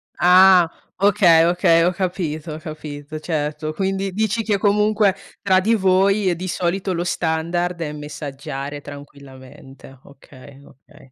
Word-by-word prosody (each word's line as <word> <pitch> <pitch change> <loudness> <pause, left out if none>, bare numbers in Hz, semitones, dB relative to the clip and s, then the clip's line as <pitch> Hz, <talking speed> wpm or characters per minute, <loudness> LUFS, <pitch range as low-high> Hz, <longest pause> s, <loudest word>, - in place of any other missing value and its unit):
Ah! 180 -1 +6 0.3
Okay, 195 -5 +4
okay, 170 -1 +3
ho 180 - +2
capito, 175 -4 -4
ho - - -6
capito, 155 -2 -8
certo. 155 -1 -3
Quindi, 195 +1 -2
dici 220 +2 -1
che, 210 -2 0
comunque, 210 0 +2 0.3
tra 190 -2 +3
di 225 +4 +1
voi, 195 0 +2
e 175 - +1
di 185 +2 -6
solito 185 +2 -2
lo 170 0 -2
standard, 175 +1 -2
è 150 -2 -4
messaggiare 145 -1 -7
tranquillamente, 135 -2 -14
okay, 140 0 -16
okay. 135 0 -20
170 Hz, 135 wpm, -20 LUFS, 150-190 Hz, 0.3 s, Ah